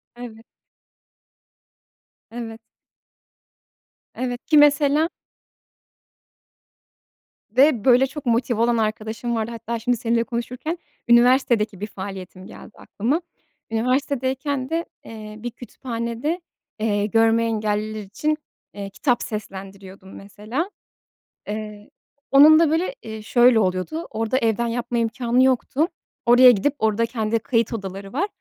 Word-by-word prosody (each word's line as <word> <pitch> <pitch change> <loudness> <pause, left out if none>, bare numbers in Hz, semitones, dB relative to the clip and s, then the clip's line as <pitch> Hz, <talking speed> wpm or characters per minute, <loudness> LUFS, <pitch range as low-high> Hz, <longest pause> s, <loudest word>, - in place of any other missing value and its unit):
Evet. 235 -2 -10 1.9
Evet. 230 -1 -7 1.6
Evet, 245 -1 -4
ki 305 - +4
mesela 295 +2 +4 2.4
ve, 255 -1 +3
böyle, 255 +1 +5
çok 290 +1 -9
motive 235 -1 +1
olan 235 0 +2
arkadaşım 220 +2 -2
vardı. 225 0 -2
Hatta 230 0 -5
şimdi 245 +2 0
seninle 230 +1 +1
konuşurken, 250 +7 -4 0.3
üniversitedeki 235 -4 +4
bir 210 - -4
faaliyetim 190 -2 -8
geldi 215 - -12
aklıma. 260 - -2 0.5
Üniversitedeyken 260 +3 -1
de, 330 +1 -1 0.2
eee, 215 -1 -9
bir 240 +2 -5
kütüphanede, 235 - -4 0.4
eee, 205 -2 0
görme 225 +1 +3
engelliler 215 -1 -2
için, 300 +10 -2 0.4
eee, 200 -1 -6
kitap 240 +4 0
seslendiriyordum 195 -2 -8
mesela. 215 - -5 0.8
Eee, 210 0 -6 0.4
onun 300 +3 +8
da, 330 -2 +4
böyle, 350 +9 0
eee, 220 -1 -7
şöyle 240 +2 +4
oluyordu, 190 - -2
orada 225 +3 -1
evden 235 -1 +1
yapma 240 +1 -2
imkânı 235 +2 +1
yoktu. 265 +4 +1 0.4
Oraya 245 +1 +8
gidip, 245 +6 0
orada 220 +1 +1
kendi 225 -1 -1
kayıt 230 0 0
odaları 195 -1 -6
var. 345 +10 0
235 Hz, 110 wpm, -22 LUFS, 215-260 Hz, 2.4 s, onun